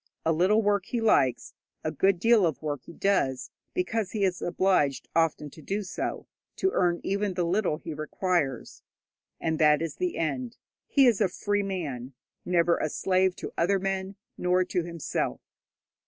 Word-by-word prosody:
A 165 Hz, -, +3 dB
little 195 Hz, +7 st, +3 dB
work 205 Hz, -2 st, +1 dB
he 240 Hz, -, -2 dB
likes; 135 Hz, -, +2 dB, 0.3 s
a -, -, -1 dB
good 195 Hz, -2 st, +2 dB
deal 225 Hz, -2 st, +5 dB
of 160 Hz, -1 st, -4 dB
work 145 Hz, -3 st, -3 dB
he -, -, -10 dB
does, 160 Hz, -9 st, 0 dB, 0.2 s
because 225 Hz, -, -1 dB
he 210 Hz, -3 st, 0 dB
is 185 Hz, -2 st, 0 dB
obliged 175 Hz, -7 st, +1 dB
often 160 Hz, -3 st, +1 dB
to 160 Hz, -, -13 dB
do 200 Hz, +7 st, -2 dB
so 185 Hz, -, -4 dB, 0.3 s
to 380 Hz, -, +1 dB
earn 175 Hz, -1 st, +1 dB
even 200 Hz, -1 st, -1 dB
the 180 Hz, -, 0 dB
little 175 Hz, -2 st, +1 dB
he 160 Hz, 0 st, -7 dB
requires. 155 Hz, -3 st, -2 dB, 0.6 s
And 160 Hz, -1 st, -1 dB
that 150 Hz, -2 st, +5 dB
is 165 Hz, -1 st, -4 dB
the 360 Hz, -1 st, -2 dB
end. 235 Hz, +9 st, -2 dB, 0.3 s
He 275 Hz, -2 st, +4 dB
is 230 Hz, -4 st, +3 dB
a 200 Hz, -, +3 dB
free 205 Hz, +3 st, -1 dB
man, 145 Hz, -10 st, -4 dB, 0.3 s
never 175 Hz, -1 st, +3 dB
a 155 Hz, -, -1 dB
slave 185 Hz, +2 st, +1 dB
to -, -, -7 dB
other 195 Hz, +4 st, +3 dB
men, 195 Hz, 0 st, -3 dB, 0.2 s
nor 180 Hz, +1 st, +2 dB
to 180 Hz, -, -1 dB
himself. 170 Hz, -2 st, -3 dB
180 Hz, 170 wpm, -27 LUFS, 160-200 Hz, 0.6 s, deal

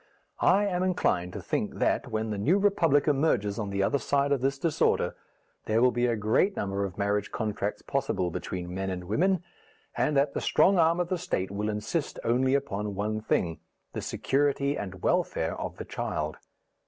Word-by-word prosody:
I 205 Hz, +2 st, +4 dB
am 180 Hz, -3 st, 0 dB
inclined 130 Hz, -, +1 dB
to -, -, -5 dB
think -, -, -2 dB
that, -, -, +1 dB
when 110 Hz, 0 st, -2 dB
the 105 Hz, -, -3 dB
New 155 Hz, -, +3 dB
Republic 165 Hz, -8 st, +3 dB
emerges 135 Hz, -9 st, +1 dB
on 105 Hz, -2 st, -2 dB
the 100 Hz, 0 st, 0 dB
other 140 Hz, +8 st, +1 dB
side 140 Hz, +1 st, +1 dB
of 140 Hz, -3 st, +2 dB
this 135 Hz, +1 st, 0 dB
disorder, 155 Hz, +2 st, +1 dB, 0.5 s
there 110 Hz, +1 st, +2 dB
will 125 Hz, +1 st, +5 dB
be 120 Hz, 0 st, +1 dB
a 120 Hz, -, +1 dB
great 110 Hz, -, +2 dB
number 100 Hz, 0 st, -2 dB
of 95 Hz, -2 st, -5 dB
marriage 100 Hz, 0 st, 0 dB
contracts 105 Hz, -2 st, -3 dB
possible 130 Hz, -10 st, -1 dB
between 90 Hz, +1 st, -5 dB
men 95 Hz, +1 st, -2 dB
and 90 Hz, -1 st, -4 dB
women, 180 Hz, -, +1 dB, 0.5 s
and 150 Hz, -, +1 dB
that 140 Hz, +1 st, +2 dB
the -, -, -2 dB
strong 190 Hz, -1 st, +4 dB
arm 165 Hz, +1 st, +4 dB
of 175 Hz, -1 st, -1 dB
the 185 Hz, -, -1 dB
State 95 Hz, -, -2 dB
will 105 Hz, +2 st, -2 dB
insist 105 Hz, +9 st, -2 dB
only 130 Hz, +3 st, +2 dB
upon 105 Hz, -7 st, -2 dB
one 105 Hz, +2 st, -2 dB
thing 85 Hz, -6 st, 0 dB, 0.3 s
the -, -, -3 dB
security 140 Hz, 0 st, 0 dB
and 100 Hz, -7 st, -6 dB
welfare -, -, +1 dB
of -, -, -5 dB
the -, -, -6 dB
child. -, -, -3 dB
120 Hz, 190 wpm, -28 LUFS, 100-145 Hz, 0.5 s, will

